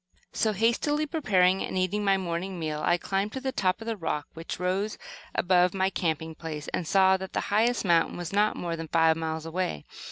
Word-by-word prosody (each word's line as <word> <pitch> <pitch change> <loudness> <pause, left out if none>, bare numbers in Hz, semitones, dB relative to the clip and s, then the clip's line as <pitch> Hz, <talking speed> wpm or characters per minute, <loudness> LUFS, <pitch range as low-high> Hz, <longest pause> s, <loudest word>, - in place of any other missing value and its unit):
So, 220 -1 +1
hastily 235 +8 +1
preparing 195 - +2
and - - -3
eating 185 +3 0
my 195 -1 +3
morning 180 +1 -3
meal, 155 -2 -3
I 175 - +3
climbed 195 +4 -2
to 265 - -3
the 265 0 -2
top 190 -1 0
of - - -7
the 230 -1 -2
rock 155 -6 -3
which 165 +1 -6
rose 190 +4 -1 0.4
above 180 0 +3
my 190 0 +1
camping 160 -3 -2
place, 155 -2 -6
and 170 - -3
saw 190 +1 +5
that 190 0 -8
the - - 0
highest 230 +2 +2
mountain 170 -2 +3
was 175 0 -5
not 210 +1 +3
more 170 -1 -3
than 165 0 -6
five 165 0 +4
miles 160 0 -3
away. 165 - -3
185 Hz, 210 wpm, -27 LUFS, 165-205 Hz, 0.4 s, saw